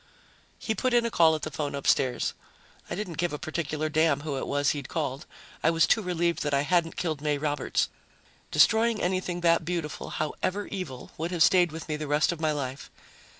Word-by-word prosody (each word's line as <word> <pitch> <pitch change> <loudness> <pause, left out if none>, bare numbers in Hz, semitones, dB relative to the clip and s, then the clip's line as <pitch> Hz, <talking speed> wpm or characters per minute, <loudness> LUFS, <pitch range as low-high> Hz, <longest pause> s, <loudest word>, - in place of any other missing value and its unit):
He 220 - -2
put 255 +2 0
in 240 -1 +4
a 235 - -1
call 160 -4 +5
at 155 - -6
the 155 - -3
phone 145 0 -3
upstairs. 135 -2 +1 0.6
I - - -3
didn't 175 -5 -5
give 175 -2 0
a - - -2
particular 155 0 -3
damn 155 -2 +2
who 150 -2 -3
it 135 - -3
was 145 0 +2
he'd 145 -3 -5
called. 145 -4 -3 0.3
I 160 - +4
was 165 0 +4
too 225 - +3
relieved 175 -2 0
that 145 -1 0
I 140 - +3
hadn't 165 +2 +1
killed 155 -5 -2
May 150 -1 0
Roberts; 145 -1 0 0.6
destroying 225 0 +4
anything 180 -1 -1
that 170 -1 +3
beautiful, 165 -2 -4
however 185 +6 -2
evil, 155 -11 -6
would 165 +2 -1
have 175 -3 +3
stayed 175 0 +4
with 160 +1 -7
me 155 -1 -2
the 155 0 -5
rest 150 +4 +2
of 170 -2 -6
my 155 -1 +2
life. 140 -2 -4
160 Hz, 205 wpm, -27 LUFS, 145-175 Hz, 0.6 s, call